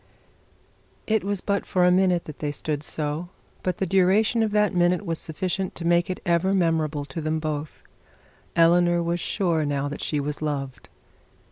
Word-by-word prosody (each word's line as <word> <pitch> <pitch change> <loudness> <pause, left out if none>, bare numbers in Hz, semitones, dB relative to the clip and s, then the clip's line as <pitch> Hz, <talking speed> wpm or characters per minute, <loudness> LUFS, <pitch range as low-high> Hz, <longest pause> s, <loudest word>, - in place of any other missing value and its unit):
It 220 -2 +1
was 200 -1 -2
but 200 -1 0
for 180 -1 +2
a 180 - +5
minute 180 -1 +3
that 155 - -9
they 145 -1 -2
stood 145 0 -3
so, 155 +2 -3 0.3
but 185 - -2
the 190 - 0
duration 195 +5 +3
of 220 - +2
that 210 0 +2
minute 180 +2 +2
was 165 -2 -2
sufficient 185 +3 -3
to 170 - -6
make 175 +2 +3
it 185 - -3
ever 175 +3 +2
memorable 160 -5 0
to 140 +3 -6
both. 155 -1 -3 0.7
Eleanor 175 +1 +4
was 170 +1 -1
sure 170 -3 0
now 145 -1 -1
that 145 - -6
she 150 - -1
was 145 +1 -4
loved. 135 -6 -4
170 Hz, 170 wpm, -25 LUFS, 155-185 Hz, 0.7 s, a